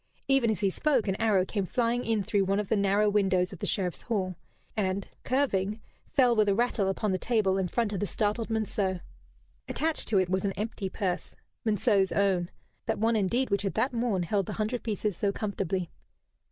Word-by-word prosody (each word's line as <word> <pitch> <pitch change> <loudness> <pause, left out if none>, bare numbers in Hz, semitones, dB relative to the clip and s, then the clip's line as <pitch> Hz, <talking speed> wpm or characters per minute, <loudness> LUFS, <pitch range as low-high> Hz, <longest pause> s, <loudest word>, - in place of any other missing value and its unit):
Even 270 -4 +3
as 215 - -1
he 195 -2 +2
spoke 265 -2 +1
an 190 - +1
arrow 210 -5 +3
came 195 -1 -2
flying 240 +2 0
in 220 -3 0
through 200 0 +1
one 195 +2 +1
of 210 - -3
the 220 - +3
narrow 200 +1 +3
windows 195 -2 +2
of 180 - -10
the - - -2
Sheriff's 180 -3 -1
hall, 190 -5 -2 0.4
and, 195 -2 -1 0.2
curving, 215 -6 0 0.3
fell 250 -3 +4
with 215 -2 +3
a 195 - +3
rattle 230 -3 +1
upon 200 +1 -1
the 185 - 0
table 205 -5 +1
in 190 - 0
front 210 +3 -1
of 195 - -2
the 205 - -1
startled 215 +3 -1
Monceux. 205 -4 -1 0.7
Attached 320 0 -1
to 215 - +2
it 185 -1 +3
was 185 +1 0
an 195 -1 0
empty 210 -1 -3
purse, 185 -3 -3 0.3
Monceux's 205 -3 +2
own 190 -3 +1 0.4
that - - 0
one 225 +2 +2
indeed 220 +5 +1
which 200 - +2
had 195 -1 -2
that 250 +4 +1
morn 230 -6 0
held 195 +2 0
the - - -4
hundred 220 +3 -2
pieces 210 -3 -2
so 200 +3 0
comfortably! 195 -4 -2
205 Hz, 205 wpm, -28 LUFS, 190-225 Hz, 0.7 s, fell